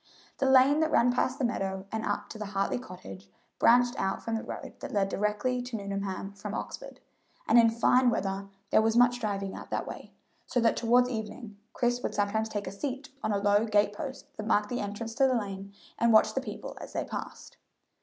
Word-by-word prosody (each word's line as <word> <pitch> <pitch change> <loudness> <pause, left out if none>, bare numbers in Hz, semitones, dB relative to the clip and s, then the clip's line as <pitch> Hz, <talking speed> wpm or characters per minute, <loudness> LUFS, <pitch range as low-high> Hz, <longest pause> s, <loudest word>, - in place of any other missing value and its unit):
The 270 - +2
lane 265 +3 +6
that 315 0 +2
ran 245 -4 +4
past 255 +1 0
the 260 - 0
meadow 190 -4 -2
and 220 0 -2
up - - -2
to 220 - -8
the 210 - -4
Hartley 195 +3 -1
cottage 100 - -10 0.3
branched 245 +2 +5
out 195 0 -1
from 230 - -3
the 225 - -1
road - - -7
that - - -6
led 195 -2 +1
directly 210 +5 0
to 250 -1 -6
Nuneham 200 -1 -4
from 200 - -6
Oxford, - - -6 0.5
and 240 - +7
in 230 -1 +6
fine 245 +2 +4
weather 195 -3 -2 0.2
there - - +6
was 225 +1 +2
much 245 0 +5
driving 200 -3 -2
out - - -9
that - - -2
way, - - -8 0.4
so 245 - 0
that 230 -1 +3
toward 245 +2 +4
evening 220 -2 -6 0.2
Chris 245 0 0
would - - -3
sometimes 215 +2 0
take 205 -2 -3
a 185 - -5
seat 270 +7 -5
on 215 - -1
a 205 - +2
low 205 +1 +3
gate 205 -2 +2
post 265 +5 -6
that 215 0 -5
marked 210 -1 +2
the 245 - -2
entrance 210 +3 -4
to 270 +2 +4
the 260 - +2
lane 200 -3 -4 0.3
and 235 0 +4
watch 220 - +5
the - - -1
people - - -7
as - - -9
they - - -1
passed. - - -7
220 Hz, 215 wpm, -29 LUFS, 200-245 Hz, 0.5 s, and